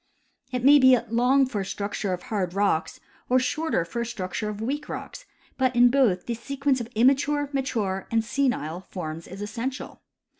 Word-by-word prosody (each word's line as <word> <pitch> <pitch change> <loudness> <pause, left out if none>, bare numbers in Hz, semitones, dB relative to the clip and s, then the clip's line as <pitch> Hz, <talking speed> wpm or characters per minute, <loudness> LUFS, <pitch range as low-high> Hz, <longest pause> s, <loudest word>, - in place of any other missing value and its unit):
It 250 -1 -2
may 290 +1 +8
be 260 -1 +7
long 255 +4 +4
for 220 -6 -3
a - - -4
structure 200 0 -3
of 180 -1 -3
hard 190 -4 -3
rocks, 200 -5 0 0.3
or 255 - +4
shorter 255 - 0
for 235 +8 -4
a - - -1
structure 210 -1 -4
of 210 -1 -6
weak 280 +7 -3
rocks; - - -7 0.3
but 260 -1 +2
in 245 0 +6
both 240 -10 +2
the 240 - -2
sequence 275 +2 -1
of 230 - -5
immature, 280 +4 +2
mature, 215 -8 -2
and 225 -1 +1
senile 200 - -1
forms 160 -3 -6
is 195 +2 -7
essential. 250 +5 -5
235 Hz, 180 wpm, -25 LUFS, 200-265 Hz, 0.3 s, may